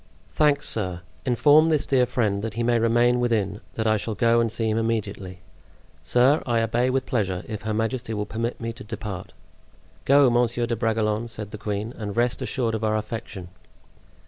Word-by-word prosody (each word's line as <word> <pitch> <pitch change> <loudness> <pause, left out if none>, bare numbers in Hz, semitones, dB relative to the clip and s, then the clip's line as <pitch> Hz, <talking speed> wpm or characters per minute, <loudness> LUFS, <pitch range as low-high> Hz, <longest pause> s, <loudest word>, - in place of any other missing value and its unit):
"Thanks, 145 -2 +2
sir. 90 -5 -1 0.3
Inform 145 +6 +5
this 155 -3 +1
dear 125 -2 +2
friend 105 -6 0
that 110 0 -5
he 120 - -1
may 120 0 +2
remain 120 +2 +3
within, 110 -4 0
that 110 - -2
I 110 0 +3
shall 110 +1 -4
go 115 +2 +3
and 115 -2 +1
see 115 0 -2
him 110 +1 +1
immediately." 100 -5 -3 0.6
"Sir, 130 +5 +3
I 115 -2 +1
obey 120 +3 +1
with 130 0 0
pleasure, 95 -5 -1
if 110 -2 -5
her 110 0 -3
majesty 115 +1 -2
will 105 0 -2
permit 115 +3 -3
me 115 0 -4
to - - -11
depart." 105 -3 -7 0.7
"Go, 140 0 +6
Monsieur 120 0 +1
de 115 0 -1
Bragelonne," 110 -1 0
said 105 -3 -8
the 105 - -8
queen, 105 +2 -3
"and 105 -1 -6
rest 120 +1 +1
assured 120 -4 -1
of 110 0 -3
our 110 0 +1
affection." 105 -4 -6
115 Hz, 190 wpm, -24 LUFS, 105-120 Hz, 0.7 s, Go